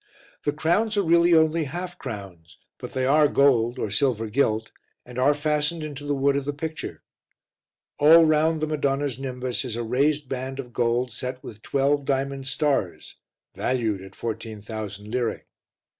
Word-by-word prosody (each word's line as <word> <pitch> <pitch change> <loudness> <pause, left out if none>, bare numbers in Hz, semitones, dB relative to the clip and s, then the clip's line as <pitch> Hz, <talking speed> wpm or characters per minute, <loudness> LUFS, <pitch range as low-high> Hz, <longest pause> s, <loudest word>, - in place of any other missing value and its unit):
The 145 - +2
crowns 175 +9 +1
are 200 - +3
really 170 0 +5
only 160 0 +3
half 175 +5 -6
crowns, 95 - -8 0.2
but - - -8
they 130 0 0
are 150 +3 +5
gold 125 -4 +3
or 105 - -3
silver 115 -1 0
gilt, 110 -3 +1 0.3
and 125 0 -7
are 145 +3 +4
fastened 150 +2 0
into 145 -1 -7
the 145 - +1
wood 140 +1 +2
of 140 -1 -1
the 145 - -2
picture. 160 +2 -6 1.0
All 160 +3 +8
round 155 +1 +2
the - - +2
Madonna's 140 -3 -1
nimbus 125 -2 -3
is 125 -4 -4
a 120 - -2
raised 140 +5 +1
band 130 +1 -4
of 125 -3 -7
gold 120 +1 +1
set 125 +2 -6
with 105 -1 -10
twelve 140 +2 +1
diamond 135 0 -1
stars, 135 - -1 0.4
valued 115 -6 -1
at 95 0 -12
14,000 110 -2 -6
lire. 125 -2 -1
135 Hz, 160 wpm, -25 LUFS, 120-150 Hz, 1.0 s, All